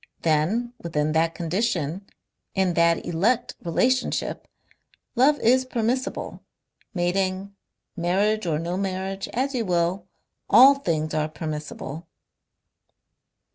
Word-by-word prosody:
Then 175 +10 +1
within 155 -2 -1
that 165 +1 +1
condition, 175 0 -2 0.5
in 190 -2 +2
that 170 0 +2
elect 220 +9 +1
relationship, 250 +10 0 0.7
love 280 +5 +4
is 255 +3 +4
permissible, 255 +1 -2 0.5
mating, 190 +2 -1 0.4
marriage 195 +4 +1
or 155 -2 +1
no 170 +3 -3
marriage, 195 0 -3
as 270 +3 -1
you 245 -3 0
will 175 0 0 0.4
all 270 +2 +9
things 160 - -2
are 155 0 0
permissible...." 155 0 -6
185 Hz, 100 wpm, -24 LUFS, 165-230 Hz, 0.7 s, all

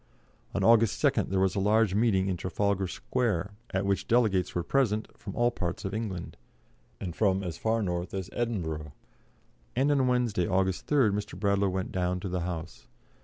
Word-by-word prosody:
On - - 0
August 115 -1 +5
2nd - - +2
there 95 - +1
was 95 -1 +2
a - - -1
large 105 0 +3
meeting 100 -3 +2
in 95 - 0
Trafalgar 95 +2 -1
Square, 105 -2 -1 0.2
at 95 +1 -1
which 100 -1 0
delegates 105 -7 +2
were 90 - 0
present 110 0 +1
from - - -8
all 120 0 +3
parts 90 -6 -4
of 95 - -3
England, 105 -6 -4 0.6
and 85 -4 -5
from 95 -2 +2
as 85 -3 -5
far 110 0 +1
north 90 -1 -2
as 95 -2 -3
Edinburgh, 80 - -3 0.8
and 135 +4 +3
on 135 -3 +3
Wednesday, 120 -8 +1
August 95 -1 0
3rd, 135 -8 +4
Mr. 100 -3 -4
Bradlaugh 100 -1 +2
went 95 0 -3
down 90 0 -1
to 95 - -5
the 90 0 -1
House. 85 -2 -5
100 Hz, 180 wpm, -29 LUFS, 90-110 Hz, 0.8 s, August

